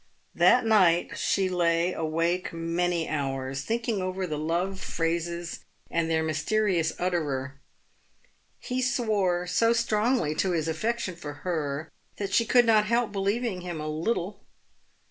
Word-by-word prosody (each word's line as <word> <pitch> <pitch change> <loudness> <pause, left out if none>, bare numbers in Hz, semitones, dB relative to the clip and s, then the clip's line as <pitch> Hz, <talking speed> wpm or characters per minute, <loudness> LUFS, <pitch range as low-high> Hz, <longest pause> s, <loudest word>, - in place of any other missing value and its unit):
That 250 - +5
night 185 -6 +4
she 195 -1 +1
lay 175 -1 +1
awake 165 +3 -1
many 170 0 -1
hours, 135 -2 -2
thinking 225 - -1
over 185 0 -2
the 155 -4 -3
love 175 +5 -1
phrases 170 0 -2 0.3
and 165 -1 0
their 160 -1 +1
mysterious 165 +2 +1
utterer. 140 -6 -2 1.0
He 255 +1 -3
swore 205 -8 +1
so 230 +6 +3
strongly 225 - +1
to 185 +3 0
his 160 -2 0
affection 195 +4 -2
for 145 -3 -7
her 155 -3 -2 0.3
that 200 -1 -4
she 230 - +4
could 245 +1 +5
not 215 -2 +4
help 235 -1 +1
believing 200 0 -1
him 175 -3 -5
a 155 - -4
little. 175 +5 -2
175 Hz, 135 wpm, -27 LUFS, 160-210 Hz, 1.0 s, That